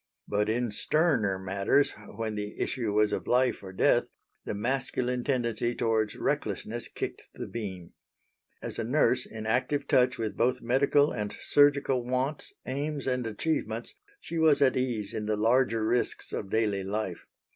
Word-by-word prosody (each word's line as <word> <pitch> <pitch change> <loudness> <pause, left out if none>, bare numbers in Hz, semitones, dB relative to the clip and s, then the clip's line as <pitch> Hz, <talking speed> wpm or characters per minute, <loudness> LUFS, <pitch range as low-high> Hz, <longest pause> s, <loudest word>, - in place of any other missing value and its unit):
But 105 +1 0
in 120 0 0
sterner 115 - +1
matters, 100 +8 +1 0.2
when 110 0 -3
the 105 0 -5
issue 115 -5 -1
was 105 0 +2
of - - -3
life 125 +1 +2
or 95 -2 -8
death, 95 - +3 0.4
the - - -3
masculine 125 +2 -1
tendency 120 -3 0
towards 110 -2 0
recklessness - - -2
kicked - - -6
the - - -5
beam. 95 -7 -6 0.7
As - - -4
a - - 0
nurse 125 0 +2
in 110 -1 -7
active 130 +5 0
touch 125 -1 +3
with 110 -3 -3
both 125 +2 +1
medical 140 +4 +3
and 105 -1 -4
surgical 140 -3 +3
wants, 130 +4 -2
aims, 145 +2 -3
and 125 -3 0
achievements, 115 -1 -2 0.3
she 170 - -4
was 155 -2 +5
at 135 -2 +4
ease 120 -6 -1
in 105 -1 -3
the 105 -1 0
larger 115 0 +2
risks 120 +2 -1
of 95 - -4
daily 105 -3 +1
life. 95 -2 -4
120 Hz, 155 wpm, -29 LUFS, 105-130 Hz, 0.7 s, was